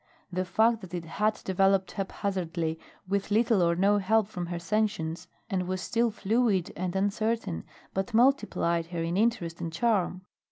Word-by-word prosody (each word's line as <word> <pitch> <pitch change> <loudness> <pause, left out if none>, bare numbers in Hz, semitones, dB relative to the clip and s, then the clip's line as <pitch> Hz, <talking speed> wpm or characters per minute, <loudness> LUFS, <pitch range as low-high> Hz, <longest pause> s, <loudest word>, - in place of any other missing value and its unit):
The 185 +1 0
fact 225 +5 +3
that 180 -2 -7
it 170 -1 -4
had 210 +6 0
developed 195 0 +2
haphazardly, 175 -5 -2 0.3
with 195 +1 -1
little 220 -1 +3
or 170 0 +3
no 200 +3 +3
help 215 +2 +2
from 180 -5 -5
her 175 0 -3
sentience, 190 -3 -1 0.2
and 185 -4 -1
was 185 0 -2
still 235 +5 +1
fluid 210 -3 +1
and 185 0 -3
uncertain, 205 - -1 0.3
but 195 +5 -2
multiplied 220 -9 +2
her 170 -1 -3
in 170 +1 -1
interest 195 -6 0
and 165 - -3
charm. 185 -1 +1
190 Hz, 160 wpm, -28 LUFS, 175-215 Hz, 0.3 s, fact